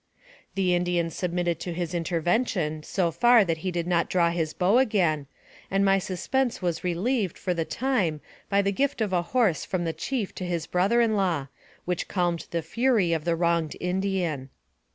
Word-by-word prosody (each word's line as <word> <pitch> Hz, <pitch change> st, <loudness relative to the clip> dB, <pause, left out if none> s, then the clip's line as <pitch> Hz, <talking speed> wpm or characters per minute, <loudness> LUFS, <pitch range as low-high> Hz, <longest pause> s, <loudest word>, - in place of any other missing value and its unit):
The 185 Hz, -2 st, +2 dB
Indian 175 Hz, -1 st, 0 dB
submitted 175 Hz, -2 st, -1 dB
to 175 Hz, -, -4 dB
his 175 Hz, 0 st, -3 dB
intervention 170 Hz, -1 st, 0 dB
so 175 Hz, +2 st, 0 dB
far 235 Hz, +6 st, +5 dB
that 165 Hz, -2 st, -1 dB
he 185 Hz, -, -2 dB
did 170 Hz, -2 st, -2 dB
not 175 Hz, -1 st, +1 dB
draw 170 Hz, -2 st, +3 dB
his 165 Hz, -2 st, -1 dB
bow 190 Hz, +9 st, +3 dB
again, 175 Hz, -, +1 dB, 0.4 s
and 195 Hz, +1 st, +2 dB
my 195 Hz, 0 st, +4 dB
suspense 225 Hz, +7 st, -1 dB
was 175 Hz, -3 st, -2 dB
relieved, 185 Hz, +3 st, 0 dB
for 180 Hz, -, -1 dB
the 165 Hz, -2 st, -2 dB
time, 210 Hz, -, 0 dB, 0.3 s
by 200 Hz, 0 st, +3 dB
the 200 Hz, -, +1 dB
gift 275 Hz, +6 st, 0 dB
of 210 Hz, -4 st, -1 dB
a 175 Hz, -, +3 dB
horse 210 Hz, -2 st, +1 dB
from 185 Hz, -2 st, -2 dB
the 165 Hz, -, -1 dB
chief 240 Hz, -2 st, -3 dB
to -, -, -1 dB
his 170 Hz, -2 st, -2 dB
brother 195 Hz, +8 st, +2 dB
in 225 Hz, -2 st, +2 dB
law, 170 Hz, -9 st, 0 dB, 0.4 s
which 180 Hz, -1 st, -2 dB
calmed 175 Hz, -3 st, -1 dB
the 170 Hz, -1 st, -2 dB
fury 220 Hz, -1 st, +2 dB
of 160 Hz, -2 st, -2 dB
the 170 Hz, -1 st, +2 dB
wronged 170 Hz, -2 st, 0 dB
Indian. 180 Hz, -7 st, -1 dB
180 Hz, 185 wpm, -26 LUFS, 170-200 Hz, 0.4 s, far